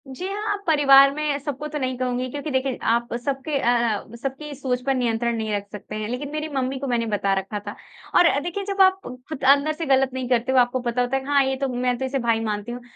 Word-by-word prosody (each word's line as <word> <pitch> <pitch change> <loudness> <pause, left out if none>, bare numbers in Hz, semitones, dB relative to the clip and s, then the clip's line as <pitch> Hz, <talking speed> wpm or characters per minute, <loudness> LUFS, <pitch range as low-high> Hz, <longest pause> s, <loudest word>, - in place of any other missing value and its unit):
जी 270 +8 -6
हाँ, 415 +2 -3
आप 405 0 -3
परिवार 275 -3 +7
में 300 -1 -1
सबको 290 +1 -5
तो - - -1
नहीं 255 -1 -2
कहूँगी, 255 0 -2
क्योंकि 290 +3 -5
देखिए 260 -1 0
आप 235 +1 0
सबके 280 +1 -1
अ 240 - +1 0.4
अ, - - -9
सबकी 275 +3 -5
सोच 255 -2 -2
पर 270 - +2
नियंत्रण 235 -1 0
नहीं 220 -1 -3
रख 200 0 -4
सकते 210 0 -8
हैं। 215 0 -3
लेकिन 255 +4 -4
मेरी 305 +1 -3
मम्मी 265 0 -1
को 275 - -4
मैंने 240 -2 0
बता 200 -2 0
रखा 195 +2 -5
था। - - -5 0.4
और 355 - +7
अ, 285 - +3
देखिए 350 +6 -4
जब 395 -1 0
आप 380 0 +5 0.3
खुद 295 -3 -6
अंदर 285 +3 +5
से 330 +2 -5
गलत 270 -1 +3
नहीं 260 -1 -3
करते 245 +1 +1
हो 260 - +2
तो - - +8
आपको 245 +1 0
पता 245 0 -1
होता 245 +2 0
है 270 - 0
कि - - -11
हाँ, 285 -1 +4
ये 265 0 0
तो 275 +1 -2
मैं 250 0 0
तो 265 - -2
इसे 270 +1 -1
भाई 230 -2 +1
मानती 210 +1 -3
हूँ। 245 +1 -6
265 Hz, 270 wpm, -23 LUFS, 245-290 Hz, 0.4 s, तो